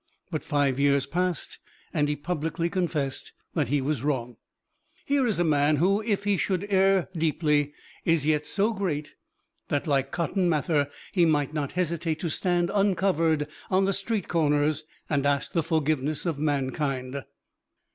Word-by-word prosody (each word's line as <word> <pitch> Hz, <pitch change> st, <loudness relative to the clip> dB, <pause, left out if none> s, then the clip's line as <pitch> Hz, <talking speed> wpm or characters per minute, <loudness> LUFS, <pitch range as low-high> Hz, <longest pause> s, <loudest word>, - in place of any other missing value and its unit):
But 155 Hz, -, -2 dB
five 140 Hz, -3 st, +1 dB
years 140 Hz, -1 st, +3 dB
passed, 175 Hz, +2 st, -2 dB, 0.3 s
and 145 Hz, -1 st, +2 dB
he 150 Hz, -, 0 dB
publicly 165 Hz, +2 st, -2 dB
confessed 155 Hz, -7 st, -2 dB, 0.2 s
that 150 Hz, -6 st, +1 dB
he 145 Hz, +3 st, +1 dB
was 140 Hz, -2 st, -1 dB
wrong. 125 Hz, -5 st, -2 dB, 0.7 s
Here 280 Hz, -2 st, +2 dB
is 215 Hz, -, 0 dB
a 175 Hz, -, +3 dB
man 150 Hz, -1 st, +3 dB
who, 190 Hz, +7 st, +2 dB
if 210 Hz, -3 st, -1 dB
he 205 Hz, -1 st, +2 dB
should 190 Hz, 0 st, 0 dB
err 190 Hz, -1 st, +4 dB
deeply, 150 Hz, -2 st, +1 dB, 0.3 s
is 165 Hz, -3 st, +2 dB
yet 150 Hz, -1 st, +1 dB
so 210 Hz, +3 st, +1 dB
great 160 Hz, -8 st, -3 dB, 0.5 s
that, 145 Hz, -, -1 dB
like 135 Hz, -3 st, +1 dB
Cotton 175 Hz, +2 st, 0 dB
Mather, 150 Hz, -2 st, +1 dB, 0.2 s
he 175 Hz, -3 st, +4 dB
might 150 Hz, -2 st, +1 dB
not 145 Hz, -3 st, -2 dB
hesitate 170 Hz, -2 st, -1 dB
to 170 Hz, -, -1 dB
stand 175 Hz, +1 st, +1 dB
uncovered 180 Hz, -6 st, +2 dB, 0.2 s
on 190 Hz, 0 st, +3 dB
the 195 Hz, -, +1 dB
street 215 Hz, -1 st, -2 dB
corners 150 Hz, -1 st, +1 dB, 0.2 s
and 145 Hz, -3 st, +1 dB
ask 140 Hz, -1 st, 0 dB
the 165 Hz, -, +1 dB
forgiveness 155 Hz, -2 st, 0 dB
of 165 Hz, -5 st, -1 dB
mankind. 135 Hz, -2 st, -1 dB
155 Hz, 155 wpm, -27 LUFS, 145-180 Hz, 0.7 s, err